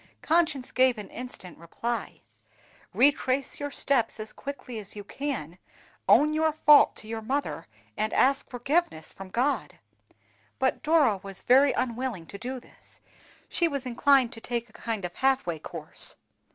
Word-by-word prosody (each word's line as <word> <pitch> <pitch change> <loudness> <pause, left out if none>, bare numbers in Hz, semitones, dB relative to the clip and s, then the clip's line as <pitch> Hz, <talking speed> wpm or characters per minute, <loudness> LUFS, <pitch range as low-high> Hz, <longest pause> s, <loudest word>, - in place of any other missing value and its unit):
Conscience 315 -6 +1
gave 255 -2 +3
an 210 -2 -8
instant 240 -9 -9
reply, 230 +8 -4 0.7
"Retrace 270 0 +2
your 290 0 -3
steps 255 -6 0
as 215 0 -6
quickly 275 -4 -7
as 205 -1 -8
you 205 - -7
can, 205 - -5 0.5
own 300 +1 +6
your 315 0 +2
fault 300 -1 +6
to 215 - -10
your 225 0 -4
mother, 275 +6 -3 0.3
and 215 - -1
ask 275 +1 +2
forgiveness 250 - -1
from 195 -1 -10
God." 255 +8 -1 0.8
But 260 0 0
Dora 300 -9 +4
was 195 -1 -10
very 270 +3 +6
unwilling 240 -7 -2
to 200 - -7
do 255 +2 -5
this; - - -19 0.5
she 340 - +1
was 280 -4 -3
inclined 255 0 +3
to 225 - -10
take 235 0 -3
a - - -23
kind 220 -5 -4
of 175 - -5
half 270 0 +2
way 170 -2 -3
course. - - -4
255 Hz, 155 wpm, -27 LUFS, 215-280 Hz, 0.8 s, own